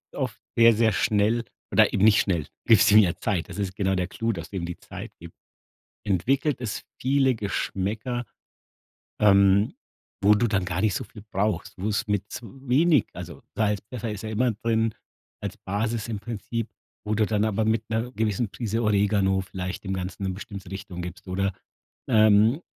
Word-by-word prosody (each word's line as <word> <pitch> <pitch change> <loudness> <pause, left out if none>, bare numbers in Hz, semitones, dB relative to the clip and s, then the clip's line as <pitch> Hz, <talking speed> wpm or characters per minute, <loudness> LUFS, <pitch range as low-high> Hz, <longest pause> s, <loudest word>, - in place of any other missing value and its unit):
oft - - -3 0.2
sehr, 115 0 +7
sehr 110 0 +3
schnell 110 +2 +2 0.3
oder - - +4
eben 95 - +1
nicht 105 -1 +6
schnell 85 -7 -1 0.2
gibst 110 -1 +6
ihm 105 - +9
ja 90 -5 +3
Zeit. 95 -5 -2
Das - - -8
ist 95 -2 -3
genau 95 -2 +1
der 90 -1 -1
Clou, 115 +4 -2
dass 85 -5 -6
du 100 - -5
ihm 85 - -3
die 85 0 -6
Zeit - - -9
gibst. 85 0 -12 0.7
Entwickelt 130 - +1
es 115 -5 -4 0.2
viele 135 0 +3
Geschmäcker, 110 +3 -2 1.0
ähm, 100 - +5 0.5
wo 105 +2 +6
du 120 +3 +2
dann 100 -4 0
gar 90 0 -2
nicht 110 -3 +2
so - - -2
viel 105 - -13
brauchst, 100 -3 -2
wo 95 +3 -3
es 110 +1 -1
mit 105 -1 0 0.2
wenig 135 - +2
also - - -8
Salz 105 -2 +1
Pfeffer 115 -3 -4
ist 105 +1 -6
ja 110 - -4
immer 120 +3 +1
drin, 110 +1 0 0.5
als - - -5
Basis 110 +3 -2
im 110 -3 -3
Prinzip, 115 +1 -4 0.4
wo 105 +1 0
du 110 0 +3
dann 105 0 +1
aber 110 0 0
mit 110 0 0
'ner 115 +3 -1
gewissen 110 -1 -1
Prise 115 0 -2
Oregano 100 -2 +2
vielleicht 95 0 -5
dem 95 - -2
Ganzen 95 +1 -4
'ne 95 - 0
bestimmte 95 -1 -8
Richtung 95 -2 -6
gibst 90 +2 -8
oder, 95 +1 -1 0.6
ähm, 110 - +5
105 Hz, 180 wpm, -25 LUFS, 95-115 Hz, 1.0 s, ihm